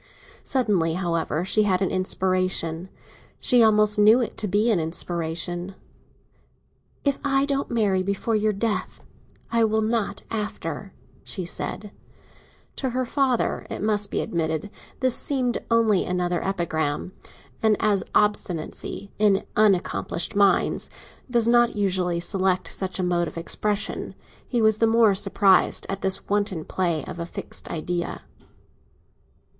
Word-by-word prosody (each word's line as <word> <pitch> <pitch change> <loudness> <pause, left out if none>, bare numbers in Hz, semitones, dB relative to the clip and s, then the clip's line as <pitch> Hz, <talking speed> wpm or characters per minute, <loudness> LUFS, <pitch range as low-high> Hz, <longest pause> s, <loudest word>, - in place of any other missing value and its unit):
Suddenly, 200 -11 +1
however, 170 -2 -1
she 215 +3 +3
had 190 -3 +2
an 190 - -1
inspiration—she 185 +4 -1
almost 210 -1 +4
knew 215 +4 +7
it 240 - -2
to 215 - -1
be 210 +4 +2
an 200 - +2
inspiration. 175 +2 -3 1.3
"If 280 -1 +1
I 275 -1 +2
don't 280 -1 -1
marry 205 -5 +1
before 200 +4 -1
your 215 0 +2
death, 210 +2 -3 0.5
I 230 0 +3
will 220 0 +2
not 215 -2 -1
after," 210 -3 -4 0.3
she 185 - -5
said. 200 +3 -5 0.9
To 265 - -1
her 255 +1 -1
father, 260 -1 0
it - - -5
must 210 -1 +1
be - - -1
admitted, 160 +3 -2 0.3
this 255 -2 +4
seemed 255 -4 0
only 225 -4 +3
another 180 -1 -1
epigram; 170 -4 -2 0.5
and 220 -2 +3
as 205 -3 +2
obstinacy, 200 -1 -1
in 205 -2 +3
unaccomplished 195 -3 +1
minds, 200 -1 +2 0.4
does 235 -2 +2
not 240 0 +4
usually 185 -4 0
select 185 +1 0
such 185 -1 -3
a 185 - -1
mode 175 -1 +1
of - - -8
expression, 205 +5 -1 0.3
he 240 -3 0
was 220 0 +3
the 225 - +4
more 225 -2 +5
surprised 195 -1 +3
at 195 0 -3
this 190 0 +1
wanton 200 -5 -1
play 170 -4 -1
of 170 - -7
a 170 - -3
fixed - - -7
idea. 170 +2 -3
200 Hz, 135 wpm, -24 LUFS, 180-220 Hz, 1.3 s, knew